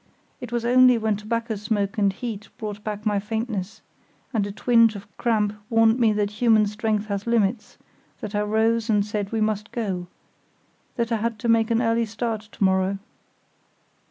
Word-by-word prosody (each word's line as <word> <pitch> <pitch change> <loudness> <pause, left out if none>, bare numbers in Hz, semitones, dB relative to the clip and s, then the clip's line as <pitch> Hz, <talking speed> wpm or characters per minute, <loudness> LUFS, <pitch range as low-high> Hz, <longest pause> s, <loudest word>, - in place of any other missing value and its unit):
It 245 - -8
was 235 -1 -1
only 250 0 +6
when 220 -1 0
tobacco 230 +2 -3
smoke 210 0 -2
and 200 -1 +3
heat 215 0 -6
brought 210 -3 -6
back 210 0 -5
my 205 -2 +2
faintness, 215 -1 -4 0.5
and 210 -3 +1
a - - -5
twinge 230 +1 +3
of 200 - -8
cramp 215 -3 +1 0.2
warned 225 +1 +4
me 230 -3 +4
that 205 -1 0
human 220 -3 +5
strength 210 0 -1
has 200 0 -4
limits, 225 -1 0 0.4
that 210 - -6
I 205 - +1
rose 220 +2 +1
and 205 -2 +3
said 210 -1 -3
we 225 -1 -1
must 215 0 -1
go; 190 -7 -3 0.9
that 235 -1 -1
I 230 - +2
had 230 +1 -2
to 235 - -4
make 230 0 +3
an 230 +1 +2
early 230 0 +1
start 225 0 -3
to 210 -1 -6
morrow. 190 +1 +2
220 Hz, 180 wpm, -24 LUFS, 205-230 Hz, 0.9 s, only